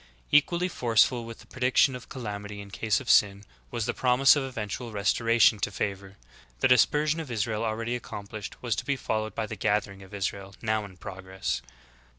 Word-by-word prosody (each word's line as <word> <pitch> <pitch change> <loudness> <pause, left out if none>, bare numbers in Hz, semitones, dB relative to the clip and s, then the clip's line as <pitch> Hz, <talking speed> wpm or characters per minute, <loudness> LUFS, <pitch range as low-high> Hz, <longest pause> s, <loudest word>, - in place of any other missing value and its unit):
Equally 170 +4 +4
forceful 120 -5 +2
with 115 0 -9
the - - -16
prediction 130 +1 +2
of 125 - -10
calamity 105 -4 -6
in 100 -1 -10
case 110 0 0
of 135 - -11
sin, 100 -1 +4 0.3
was 115 - -2
the 120 - -1
promise 130 +2 +5
of 145 - 0
eventual 120 -2 -5
restor 110 +3 0
ation 115 -2 +5
to 100 - 0
favor. 100 -1 -4 0.4
The - - +5
dispersion 150 +5 +3
of 160 -4 -6
Israel 110 -1 -1
already 115 +2 -2
accom 100 -3 -8
plished, 110 -1 -7
was 120 -3 0
to - - -3
be 140 - +1
followed 110 -4 -3
by 110 - -1
the - - -6
gathering 105 -2 -1
of 95 - -14
Israel 100 0 -4
now 110 -1 -1
in 95 -2 -13
progress.' 95 -7 -4
110 Hz, 190 wpm, -27 LUFS, 100-125 Hz, 0.4 s, promise